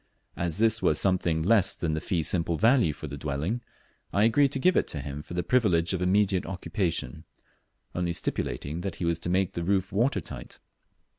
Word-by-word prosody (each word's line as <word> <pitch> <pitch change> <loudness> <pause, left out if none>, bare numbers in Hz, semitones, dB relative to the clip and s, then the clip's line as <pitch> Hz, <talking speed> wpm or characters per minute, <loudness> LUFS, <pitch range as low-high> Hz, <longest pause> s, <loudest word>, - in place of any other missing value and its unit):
As 85 -2 -2
this 115 0 +3
was 75 - +2
something 90 -4 +1
less 100 0 +3
than 80 -2 -2
the 80 - -2
fee 85 -3 -1
simple 85 0 0
value 115 - +4
of - - -3
the 70 - -6
dwelling, 75 - -2 0.5
I 100 - +2
agreed 130 +5 +4
to 135 - -1
give 185 +6 +3
it - - +1
him 70 -1 -5
for 85 - -9
the 90 - 0
privilege 90 -8 +2
of 90 - -2
immediate 95 0 +2
occupation, 90 - -3 0.7
only 90 -1 -1
stipulating 80 -1 -3
that 95 -2 -4
he 90 - -3
was 85 0 0
to 85 - -4
make 95 0 +1
the 85 - -3
roof 95 +1 0
water 110 +3 +1
tight. 85 - -8
90 Hz, 195 wpm, -27 LUFS, 80-105 Hz, 0.7 s, value